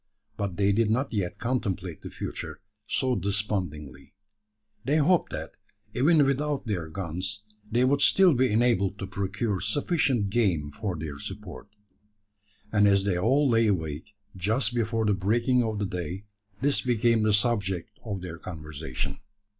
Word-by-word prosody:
But 100 -4 -3
they 100 0 +3
did 110 +1 +2
not 125 +4 0
yet 95 -5 -2
contemplate 95 -9 -2
the - - -7
future - - -6 0.3
so 130 -2 +1
despondingly. 95 - -3 0.7
They 145 +5 +2
hoped 165 +4 +3
that, - - -6 0.4
even 145 +4 +4
without 140 +1 0
their 90 -8 -2
guns, 95 +4 -4 0.3
they 120 +3 +3
would 140 +2 +2
still 190 +1 +6
be 130 -2 +2
enabled 105 -4 +2
to 95 - -4
procure 100 +1 -2
sufficient 120 - +1
game 90 -11 +1
for 95 +3 -3
their 75 -2 -6
support; 100 +2 -7 1.0
and 105 -1 +4
as 100 -1 +4
they 100 -2 +1
all 135 +9 +3
lay 115 -2 +4
awake, 80 +1 -2 0.2
just 110 +6 +1
before 115 -1 0
the 105 - +3
breaking 115 +7 +2
of 110 -3 -1
the 100 - -1
day, 90 +1 -4 0.4
this 140 +1 +2
became 120 -2 +2
the 110 0 +3
subject 100 -3 0
of 100 -5 -4
their 85 -2 -7
conversation. 75 -5 -5
105 Hz, 150 wpm, -27 LUFS, 95-120 Hz, 1.0 s, still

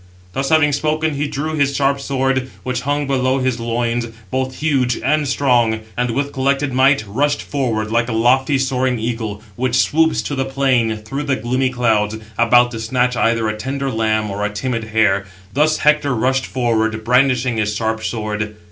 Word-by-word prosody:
Thus 135 +4 -2
having 155 -2 +4
spoken, 155 +2 0
he 145 +1 -2
drew 150 +2 -3
his 140 -2 +1
sharp 140 0 +1
sword, 135 -1 -1
which 125 -1 -2
hung 145 +2 -1
below 130 -1 +1
his 130 -2 -1
loins, 115 0 -1 0.2
both 130 0 -2
huge 135 -6 0
and 150 +2 0
strong, 120 -5 +2
and, 125 0 0
with 140 +4 -2
collected 135 +1 0
might, 130 -2 +3
rushed 145 +8 0
forward, 115 -6 -2
like 115 +1 +1
a - - -2
lofty 130 +5 +3
soaring 130 -1 0
eagle, 110 -2 -4
which 125 0 -1
swoops 160 +5 +2
to - - -4
the 135 -1 0
plain 130 -4 +1
through 135 +7 -5
the 140 -2 +1
gloomy 130 +3 0
clouds, 110 -4 +1 0.2
about 120 +2 +4
to 115 - -5
snatch 125 +2 0
either 115 -1 +1
a 110 - -1
tender 135 +4 -3
lamb, 110 -2 0
or 100 +1 -3
a 105 - 0
timid 115 +2 -3
hare; 110 -3 +2 0.3
thus 155 +3 +2
Hector 150 -3 +2
rushed 130 +3 0
forward, 110 -3 0
brandishing 125 0 +2
his 105 -1 0
sharp 110 0 -2
sword. 105 -2 -3
125 Hz, 180 wpm, -18 LUFS, 115-135 Hz, 0.3 s, having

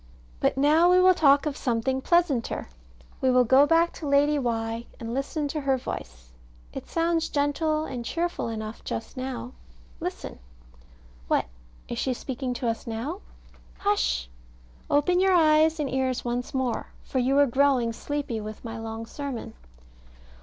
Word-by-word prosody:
But - - +1
now 310 +5 +5
we 365 0 +6
will 370 0 +6
talk 285 -4 +4
of 295 -2 -2
something 260 +1 -1
pleasanter. 325 - +1 0.5
We 260 - +3
will 250 0 +5
go 265 +4 +5
back 335 +1 +3
to 305 - -6
Lady 285 +1 +3
Why, 230 -2 -2
and 230 0 -5
listen 285 +3 -2
to 305 +1 -3
her 270 -1 +1
voice. - - -7 0.4
It - - -7
sounds 330 -1 0
gentle 305 +2 0
and 245 -5 -5
cheerful 340 +4 -2
enough 220 0 -6
just 225 - -5
now. 255 - -5 0.5
Listen. - - -5 0.9
What? - - +2 0.4
is 235 - -4
she 260 -2 0
speaking 255 0 -4
to 245 - -2
us 230 0 -2
now? 255 - -4 0.6
Hush! 400 - 0 0.6
open 325 +5 +3
your 380 0 +4
eyes 315 -1 +4
and 295 - 0
ears 260 -1 -1
once 240 +1 -2
more, 260 -3 -1 0.2
for 260 - -2
you 260 +3 +2
are 285 - +6
growing 260 -3 +2
sleepy 265 -2 -3
with 215 +2 -8
my 225 0 -5
long 225 0 -5
sermon. 275 0 -6
270 Hz, 155 wpm, -26 LUFS, 235-305 Hz, 0.9 s, we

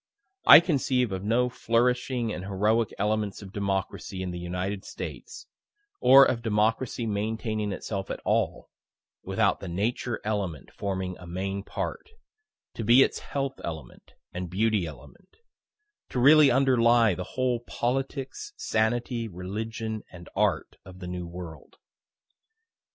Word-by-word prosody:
I 155 - +11
conceive 130 - +1
of 95 0 -4
no 115 +4 +2
flourishing 120 0 0
and 90 - -5
heroic 105 +3 +1
elements 105 0 -1
of 95 0 -11
Democracy 95 -1 -3
in 90 - -4
the 90 - -5
United 90 +3 -3
States, 475 - -8 0.5
or 135 +1 +8
of 120 -3 0
Democracy 115 +2 0
maintaining 110 0 -2
itself 95 0 -4
at - - -4
all, - - 0 0.5
without - - +1
the 95 - -7
Nature 110 +6 -2
element 100 -8 -3
forming 95 -3 -4
a 90 - -11
main 95 +3 -3
part 265 - -5 0.6
to 115 - -5
be 120 +5 +7
its - - -1
health 135 -1 -4
element 80 -7 -8 0.2
and 90 0 -4
beauty 105 -1 +1
element 75 - -14 0.7
to 125 - -2
really 145 +3 +7
underlie 120 -4 +4
the 90 - -4
whole 125 -2 +1
politics, 135 - -3
sanity, 115 +1 0
religion 110 +4 -5
and 85 -2 -12
art - - 0
of 95 -1 -12
the 90 -1 -8
New 90 -1 -5
World. 85 -2 -10
110 Hz, 135 wpm, -27 LUFS, 95-120 Hz, 0.7 s, I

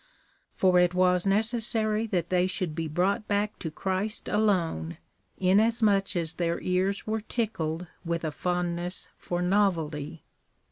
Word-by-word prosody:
For 185 -1 +4
it 180 0 +3
was 180 0 +3
necessary 220 +1 +1
that 175 -5 -1
they 180 0 +2
should 185 -4 -2
be 165 0 -3
brought 190 +8 0
back 205 +1 -1
to 160 - -4
Christ 190 +6 -2
alone, 175 - 0 0.4
inasmuch 205 +1 +3
as 165 -2 -1
their 170 -1 -1
ears 185 +2 0
were 220 0 -1
tickled 180 -8 -2 0.2
with 170 -1 -2
a 155 - -1
fond 175 +3 -1
ness 175 +1 -3
for 175 0 -3
novelty. 165 -6 0
185 Hz, 140 wpm, -27 LUFS, 170-210 Hz, 0.4 s, For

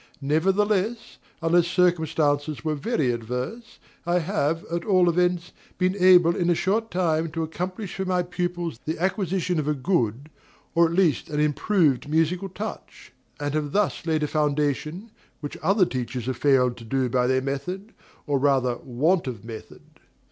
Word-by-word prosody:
Nevertheless, 195 +9 0 0.2
unless 170 +1 +3
circumstances 160 -4 +1
were 155 - +1
very 150 - 0
adverse, 125 - -5 0.3
I 175 +1 +1
have, 165 -3 -1
at 170 0 -2
all 185 -4 +3
events, 180 0 +1 0.3
been 185 +1 +1
able 180 -3 +6
in 175 -1 0
a 175 - +4
short 220 +6 0
time 165 -3 0
to 165 -1 -1
accomplish 180 +5 -5
for 190 - -3
my 180 -1 +1
pupils 175 -5 -3
the 160 - -2
acquisition 185 -1 0
of 150 - -2
a 150 - +1
good, 135 - -1 0.4
or 170 0 +5
at 165 - -4
least 175 -4 +2
an 150 -1 -2
improved, 150 - +2
musical 165 +5 +1
touch; 205 - -8 0.3
and 145 0 -2
have 150 -2 -2
thus 205 0 0
laid 155 -1 +1
a - - +1
foundation, 150 - -1 0.3
which 145 - -6
other 190 +3 +3
teachers 125 -4 -4
have 130 -1 -3
failed 130 -4 +3
to 115 - -10
do 130 +3 0
by 125 0 +1
their 130 0 +2
method, 180 +10 -4 0.3
or 145 -2 +1
rather 130 -3 +2
want 150 +9 0
of 115 -5 -6
method. 115 -2 -10
165 Hz, 160 wpm, -25 LUFS, 140-180 Hz, 0.4 s, able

